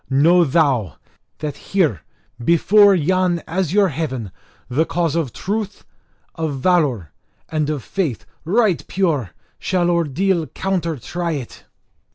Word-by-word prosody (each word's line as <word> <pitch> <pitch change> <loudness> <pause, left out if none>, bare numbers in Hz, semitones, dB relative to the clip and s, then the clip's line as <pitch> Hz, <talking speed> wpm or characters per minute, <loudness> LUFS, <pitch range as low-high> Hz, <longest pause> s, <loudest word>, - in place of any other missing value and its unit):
know 165 +6 +5
thou, 135 - +1 0.4
that 150 -2 -4
here 155 - 0 0.4
before 200 - +5
yon 180 +1 +1
azure 190 +3 +1
heaven 130 - -4 0.4
the 130 +7 +1
cause 165 -1 -1
of 160 -7 -1
truth, 210 - -4 0.5
of 160 -4 -3
valour, 135 - +1 0.4
and 155 -2 -1
of 145 -5 -3
faith 165 - -3 0.2
right 195 +1 +1
pure 160 - 0 0.3
shall 175 -2 +1
ordeal 170 +1 0
counter 175 -5 -2
try 170 +7 -3
it!" 135 -6 -7
165 Hz, 120 wpm, -20 LUFS, 140-185 Hz, 0.5 s, know